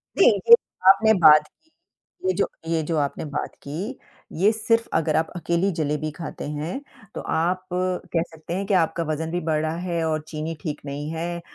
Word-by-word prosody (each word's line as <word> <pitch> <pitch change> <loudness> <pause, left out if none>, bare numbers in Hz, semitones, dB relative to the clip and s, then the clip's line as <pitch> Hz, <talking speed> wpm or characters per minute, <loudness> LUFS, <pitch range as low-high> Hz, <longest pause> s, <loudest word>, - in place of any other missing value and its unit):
जी, - - +5
ये 470 - +5 0.4
आपने 220 +3 +6
बात 150 -1 +8
की, 320 - -38 0.6
ये 375 - +3
जो - - +1 0.2
ये 165 -1 +1
जो 160 +1 -1
आपने 145 +1 -1
बात 145 -1 -4
की 185 - -5 0.4
ये 200 +4 +5
सिर्फ़ 230 +1 +1
अगर 160 -1 +1
आप 160 - +1
अकेली 170 +3 0
जलेबी 155 -2 -2
खाते 155 +1 -7
हैं, 155 - -4 0.3
तो - - -4
आप 180 +3 0
कह 180 -2 -1
सकते 160 +1 -8
हैं 195 +2 -2
कि 200 - 0
आपका 170 -2 +2
वज़न 160 +1 -3
भी 175 - -1
बढ़ा 155 0 +1 0.2
है 170 -2 -1
और 155 -1 0
चीनी 155 +1 -4
ठीक 150 -1 -4
नहीं 145 +1 -5
है 170 +1 -4
165 Hz, 185 wpm, -24 LUFS, 155-185 Hz, 0.6 s, बात